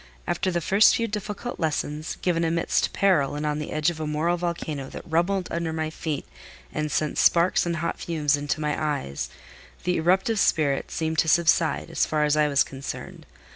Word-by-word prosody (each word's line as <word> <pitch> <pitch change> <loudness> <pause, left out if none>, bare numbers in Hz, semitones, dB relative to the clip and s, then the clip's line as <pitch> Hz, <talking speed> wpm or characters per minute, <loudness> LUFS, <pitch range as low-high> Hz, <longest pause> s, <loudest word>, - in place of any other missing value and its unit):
After 190 - 0
the 175 -1 -1
first 195 +6 +5
few 230 - 0
difficult 210 +3 -5
lessons, 155 -1 -2
given 170 -2 +1
amidst 165 0 +1
peril 165 -8 +2
and 150 +1 -3
on 150 0 -1
the 150 - -5
edge 155 +2 +1
of 160 - -9
a 155 - -3
moral 155 +3 +1
volcano 165 -5 -4
that - - -8
rumbled 175 +3 +1
under 170 -1 -2
my 160 -1 -2
feet 155 -3 -4 0.5
and 150 0 -2
sent 155 -1 0
sparks 175 +1 +4
and 170 - 0
hot 170 +1 -3
fumes 150 -4 +1
into 145 +1 -2
my 150 -1 0
eyes, 70 - -2 0.5
the 180 0 +1
eruptive 190 +6 +2
spirit 145 -7 +2
seemed 160 0 -1
to - - +3
subside, 165 0 +2
as - - +1
far 155 -1 +1
as 150 0 +3
I 150 -1 +3
was 140 -1 +4
concerned. 135 0 -8
160 Hz, 190 wpm, -25 LUFS, 150-175 Hz, 0.5 s, first